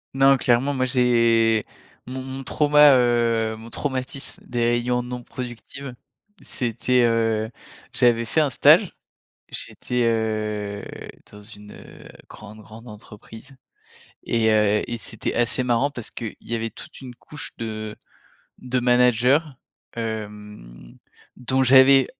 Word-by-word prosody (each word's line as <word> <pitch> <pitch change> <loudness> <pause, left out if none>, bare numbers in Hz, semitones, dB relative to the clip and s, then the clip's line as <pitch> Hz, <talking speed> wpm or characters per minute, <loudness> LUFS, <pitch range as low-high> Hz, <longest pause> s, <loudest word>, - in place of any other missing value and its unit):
Non, 135 0 +5
clairement, 130 +3 +1
moi, 130 -1 0
j'ai 115 -3 +3 0.4
mon 130 +1 -6
mon 130 +1 -7
trauma 150 0 +5
heu, 115 -2 +1
mon 115 +1 -12
traumatisme 135 0 -4
des 120 -1 -4 0.2
réunions 125 +1 -1
non 125 0 -7
productives. 125 +2 -8 0.5
C'était, 125 +1 0
heu, 115 -1 0 0.4
j'avais 115 -1 +3
fait 155 +7 +1
un 145 - +1
stage, - - +4 0.5
j'étais, 125 0 -3
heu, 110 -3 -2 0.5
dans 105 0 -13
une, 105 -1 -12
heu, - - -14 0.2
grande, 105 0 -12
grande 115 +3 -13
entreprise 110 +5 -13 0.7
et 115 -1 +1
heu 105 -1 +3
et 120 - -3
c'était 110 -1 -5
assez 120 +1 0
marrant 125 +3 +1
parce 120 -5 -8
qu'il 115 -3 -7
y 115 - -5
avait 115 0 -3
toute - - -12
une 125 -2 -10
couche 150 +5 -8
de 110 -1 -5 0.6
de 130 0 -2
managers, 125 +2 +4 0.6
hem, 105 - -8 0.4
dont 130 +1 0
j'avais, 130 +1 +6
120 Hz, 125 wpm, -23 LUFS, 110-130 Hz, 0.7 s, j'avais